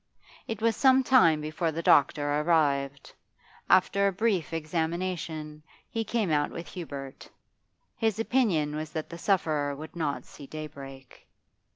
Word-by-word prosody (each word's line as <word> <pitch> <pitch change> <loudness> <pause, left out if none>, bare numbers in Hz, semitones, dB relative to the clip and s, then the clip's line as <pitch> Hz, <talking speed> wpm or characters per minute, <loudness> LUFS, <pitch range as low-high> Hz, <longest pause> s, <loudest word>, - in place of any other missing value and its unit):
It 225 -1 -5
was 230 -1 +3
some 265 +1 +5
time 170 -13 +5
before 155 +2 -2
the 165 +2 -4
doctor 145 0 +3
arrived. 140 -4 0 0.6
After 200 +2 +4
a - - +2
brief 195 -3 0
examination, 160 -1 -3 0.3
he 225 - -1
came 215 -4 -1
out 145 -1 +2
with 170 0 -7
Hubert; 140 -6 -8 0.7
his 220 -3 0
opinion 205 - +1
was 155 0 -4
that 160 0 -5
the 170 - -8
sufferer 155 -8 0
would 155 +4 -10
not 155 -4 -2
see 140 - -12
daybreak. 140 -4 -10
160 Hz, 140 wpm, -28 LUFS, 150-195 Hz, 0.7 s, some